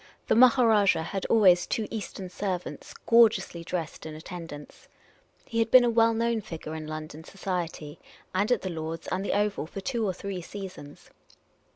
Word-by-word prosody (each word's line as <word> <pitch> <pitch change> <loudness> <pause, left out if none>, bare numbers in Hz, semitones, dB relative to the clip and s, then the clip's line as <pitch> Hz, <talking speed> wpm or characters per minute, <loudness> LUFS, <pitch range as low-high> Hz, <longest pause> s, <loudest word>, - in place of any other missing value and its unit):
The - - +4
Maha 255 +1 +6
rajah 205 -7 +4
had 195 +3 -4
always 185 -6 +5
two 220 -2 -2
Eastern 200 -3 -5
servants, 185 -2 -5
gorgeously 215 -7 +4
dressed, 170 -2 -5
in 155 - -7
attendance; 160 -2 -10 0.6
he 230 - -3
had 225 0 +2
been 255 +1 +8
a 240 - +2
well 230 0 +4
known 230 0 0
figure 160 -4 -7
in 155 -1 -6
London 155 0 -7
society, 175 -5 -5 0.3
and 200 +5 +1
at 225 -6 +1
Lord's 165 -1 -5
and 185 +1 -2
the - - -1
Oval, 205 -6 0
for 195 - -7
two 235 +3 -2
or 195 -3 0
three 195 -1 -5
seasons. 185 -6 -10
190 Hz, 170 wpm, -27 LUFS, 165-220 Hz, 0.6 s, been